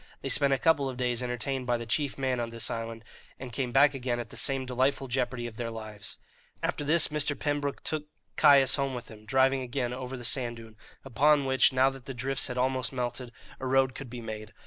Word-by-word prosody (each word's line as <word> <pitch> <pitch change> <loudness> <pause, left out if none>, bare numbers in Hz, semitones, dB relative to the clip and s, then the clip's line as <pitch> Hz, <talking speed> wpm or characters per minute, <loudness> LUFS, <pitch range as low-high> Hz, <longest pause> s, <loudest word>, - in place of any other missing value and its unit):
They - - -2
spent 140 -1 +2
a 135 - +3
couple 140 -1 +2
of 130 - -7
days 125 -1 0
entertained 125 +1 -2
by 120 -1 +2
the 115 - -6
chief 140 +4 -1
man 130 -2 0
of 120 -1 -2
this 115 0 -3
island, 115 0 -5 0.3
and 130 -2 -8
came 130 -2 -2
back 140 +3 +5
again 125 -2 -2
at 120 - -6
the - - -10
same 135 -2 0
delightful 130 +2 0
jeopardy 125 -1 -1
of 115 -2 -7
their 120 -1 -3
lives. 110 -3 -7 0.5
After - - -1
this 160 +3 +5
Mr. 150 -1 +2
Pembroke 145 -1 -2
took 155 -1 -2 0.3
Caius 140 -3 +6
home 135 -2 -1
with 120 -2 -8
him, 110 -1 -13
driving 135 +2 +3
again 125 -1 -2
over 130 +1 -5
the 120 - -8
sand 120 -3 +2
dune, 115 -1 -12 0.3
upon 140 +3 +3
which, 130 0 +4
now 130 +1 +3
that 135 -2 -12
the 135 - -6
drifts 135 +3 -1
had 125 - -5
almost 130 -1 0
melted, 125 -1 -3 0.3
a 130 - -4
road 130 0 +3
could 135 -1 -8
be 120 0 -7
made. 110 -1 -7
130 Hz, 225 wpm, -29 LUFS, 120-135 Hz, 0.5 s, Caius